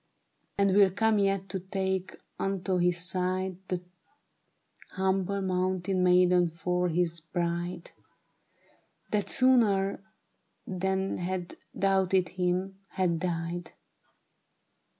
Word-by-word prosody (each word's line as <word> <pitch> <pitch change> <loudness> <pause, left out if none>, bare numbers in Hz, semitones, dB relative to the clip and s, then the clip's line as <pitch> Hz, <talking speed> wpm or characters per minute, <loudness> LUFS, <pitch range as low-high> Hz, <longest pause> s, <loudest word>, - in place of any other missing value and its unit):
And 200 -1 +3
will 200 -2 +6
come 215 +2 +2
yet 195 -1 +1
to 190 - -3
take 190 0 -2 0.2
unto 190 -1 -1
his 175 0 +2
side 185 +1 -2
The 180 -1 -3 1.1
humble 190 +1 0
mountain 185 0 0
maiden 180 -1 +4
for 180 +2 -1
his 170 0 0
bride, 170 +1 -3 1.2
That 210 -1 0
sooner 205 -7 +3 0.6
than 190 +1 -1
had 180 0 -4 0.2
doubted 190 -2 +2
him, 185 +1 -2
had 180 -3 0
died.' 170 0 -3
185 Hz, 95 wpm, -29 LUFS, 180-195 Hz, 1.2 s, will